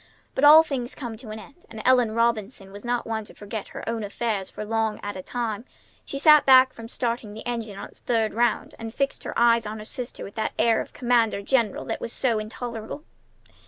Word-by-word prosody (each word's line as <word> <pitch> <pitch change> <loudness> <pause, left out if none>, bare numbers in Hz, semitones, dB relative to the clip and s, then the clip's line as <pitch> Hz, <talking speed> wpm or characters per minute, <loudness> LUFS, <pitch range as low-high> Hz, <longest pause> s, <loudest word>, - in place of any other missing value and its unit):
But 265 - -2
all 305 +2 +10
things 260 -6 -4
come 240 -5 -6
to 230 -1 -11
an 215 - -6
end, 280 +10 -14
and 220 - -9
Ellen 250 -4 +4
Robinson 225 -3 -1
was 205 +1 -10
not 240 0 -1
one 220 -1 -3
to - - -15
forget 205 0 -6
her - - -9
own 230 -1 -2
affairs 205 -1 -2
for 210 - -7
long 220 0 -1
at 205 - -4
a 185 - -5
time. 225 0 -3 0.4
She 275 - -5
sat 300 +1 +7
back 260 -1 +7
from 230 0 -9
starting 230 -3 -3
the 220 - -9
engine 230 -4 -4
on 200 - -7
its - - -16
third 225 -3 0
round, 240 +1 0
and 225 0 -6
fixed 275 0 -1
her - - -4
eyes 235 -2 +4
on 215 +1 -5
her 215 - -8
sister 245 +2 -6
with 200 - -9
that 220 -1 -2
air 230 -1 +3
of - - -9
commander 235 -4 +1
general 230 -3 +1
that - - -4
was 230 - -4
so 235 -4 +1
intolerable. 230 +4 -6
230 Hz, 225 wpm, -25 LUFS, 215-245 Hz, 0.4 s, all